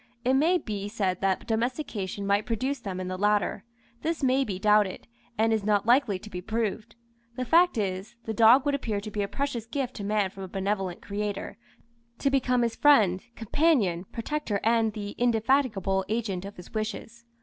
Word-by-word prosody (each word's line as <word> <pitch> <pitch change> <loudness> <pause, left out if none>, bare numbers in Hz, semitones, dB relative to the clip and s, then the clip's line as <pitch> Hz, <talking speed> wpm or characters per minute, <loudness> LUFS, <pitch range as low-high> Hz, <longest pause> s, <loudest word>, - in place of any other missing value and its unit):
It 255 - +3
may 320 +7 +4
be 205 - -5
said 195 -4 -2
that 195 -1 0
domestication 220 -4 -2
might 200 +1 +1
produce 260 +5 -1
them 185 -2 -5
in 185 - -4
the 185 0 -4
latter. 205 -1 +1 0.4
This 325 -2 -2
may 265 +1 +3
be 200 -7 -4
doubted, 210 -1 +2 0.3
and 225 +1 +3
is 220 -2 0
not 205 -1 +2
likely 240 -4 +3
to 210 - -12
be 180 - -5
proved; 220 +1 -3 0.4
the 255 - -3
fact 340 +3 +4
is, 195 +2 -3
the 220 - -3
dog 235 +5 +6
would 285 - +1
appear 225 -7 -1
to 210 +1 -7
be 210 - -2
a 200 - -1
precious 255 -3 -3
gift 255 +1 -3
to 205 - -5
man 205 -2 0
from 195 - -10
a 190 - -5
benevolent 195 -1 -3
Creator, 205 0 -4 0.6
to 275 - 0
become 250 -2 +2
his 230 -1 -1
friend, 210 -11 +4
companion, 225 - +1
protector, 235 -3 -2
and 225 -1 +2
the 205 -1 -5
indefatigable 225 -5 +2
agent 210 -5 -2
of 200 +1 -8
his 180 - -12
wishes. 220 +2 -5
215 Hz, 185 wpm, -27 LUFS, 200-245 Hz, 0.6 s, dog